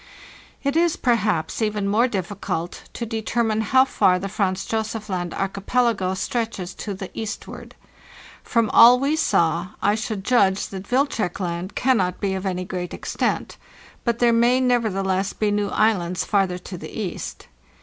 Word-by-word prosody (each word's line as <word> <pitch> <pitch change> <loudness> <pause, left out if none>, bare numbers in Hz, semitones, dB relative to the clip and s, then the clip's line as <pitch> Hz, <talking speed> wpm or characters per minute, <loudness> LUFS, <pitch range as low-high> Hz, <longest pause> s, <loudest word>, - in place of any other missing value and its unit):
It 280 +1 0
is, 335 0 +3
perhaps, 215 -8 0
even 210 -2 0
more 220 +5 +3
difficult 185 -4 -4
to 235 - -4
determine 225 0 -1
how 260 +4 +4
far 185 -8 +3
the 195 +2 -4
Franz 190 -1 -1
Josef 220 -1 -3
Land 175 -2 -2
archipelago 195 0 0
stretches 200 -4 -3
to 205 -2 -5
the 190 0 -7
eastward. 220 0 -7 0.7
From 230 -3 +1
all 245 +2 +8
we 280 +3 +1
saw, 170 - +1
I 205 - +2
should 215 -2 -3
judge 200 -4 +2
that 195 0 -8
Wilczek 245 - 0
Land 180 +1 -4
cannot 195 -9 +1
be 195 -1 -1
of 190 +1 -3
any 185 -1 -2
great 180 -1 -5
extent; - - -2 0.5
but 235 -1 0
there 240 -1 +4
may 240 +2 +4
nevertheless 195 -6 +1
be 210 -1 0
new 205 0 0
islands 185 -5 +1
farther 195 -3 +1
to 180 0 -9
the - - -8
east. 210 -5 -5
205 Hz, 155 wpm, -23 LUFS, 185-235 Hz, 0.7 s, all